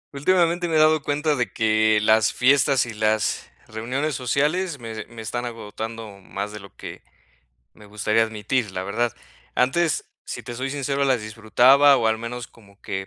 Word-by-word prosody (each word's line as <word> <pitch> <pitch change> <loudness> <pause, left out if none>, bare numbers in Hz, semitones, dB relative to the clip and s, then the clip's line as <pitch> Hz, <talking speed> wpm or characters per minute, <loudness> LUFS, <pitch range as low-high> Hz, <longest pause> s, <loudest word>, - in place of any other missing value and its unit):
Últimamente 175 +3 +2
me 165 - -1
he - - +5
dado 155 0 +4
cuenta 150 +2 0
de 120 -7 -2
que, 110 0 +2
las 110 0 +3
fiestas 135 0 +3
y 120 - -7
las 110 0 0 0.2
reuniones 125 +8 -3
sociales 150 +7 0
me 115 -3 -8
de 110 -1 -6
me 115 -1 -10
están 120 +3 -3
agotando 110 -2 -7
más 100 +2 -5
de 105 - -8
lo 100 0 -12
que - - -9 0.7
me 105 - -16
gustaría 105 +2 +1
admitir, 110 0 -2
la 95 - -3
verdad. 110 +4 -1 0.4
Antes, 155 +5 +1 0.2
si - - -6
te 120 - -7
soy 130 +3 -3
sincero, 140 0 -1
las 130 -5 +1
disfrutaba 125 +6 +4
o 115 - +1
al 110 0 0
menos 120 +1 -6
como 100 -3 -21
que 95 0 -4
115 Hz, 180 wpm, -23 LUFS, 110-140 Hz, 0.7 s, he